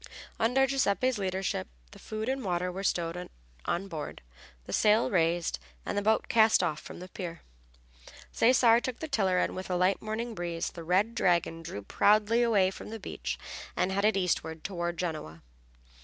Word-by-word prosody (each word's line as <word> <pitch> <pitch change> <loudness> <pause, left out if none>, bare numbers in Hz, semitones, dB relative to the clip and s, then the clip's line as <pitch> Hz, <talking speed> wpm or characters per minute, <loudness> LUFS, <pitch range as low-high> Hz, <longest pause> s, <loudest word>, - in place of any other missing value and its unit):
Under 250 +4 +3
Giuseppe's 255 -3 +1
leadership 190 - -2 0.2
the - - -13
food 215 +1 -5
and 265 0 -1
water 180 -1 -1
were 190 +2 -5
stowed 175 -1 -1 0.4
on 195 +3 -1
board, 155 - -6 0.4
the - - -6
sail 215 +1 +4
raised, 170 - +1 0.3
and - - -3
the 205 - +1
boat 220 +2 +2
cast 220 -1 +5
off 150 - -1
from - - -10
the 180 - -8
pier. 170 -3 -7 0.9
Cesare 235 -1 +5
took 255 -1 -3
the 320 - -5
tiller 195 -10 +1
and - - 0
with 185 0 -6
a 180 - 0
light 185 +2 +2
morning 225 +2 -3
breeze 175 -3 -3
the 170 - -8
Red 190 +7 +2
Dragon 170 -4 +1
drew 160 -11 -7
proudly 215 - +3
away 205 -6 +3
from - - -9
the 225 +1 -6
beach - - -4 0.4
and 185 - +1
headed 200 +2 +2
eastward 160 -3 -1
toward 175 -2 -3
Genoa. 155 - -4
190 Hz, 170 wpm, -29 LUFS, 175-220 Hz, 0.9 s, cast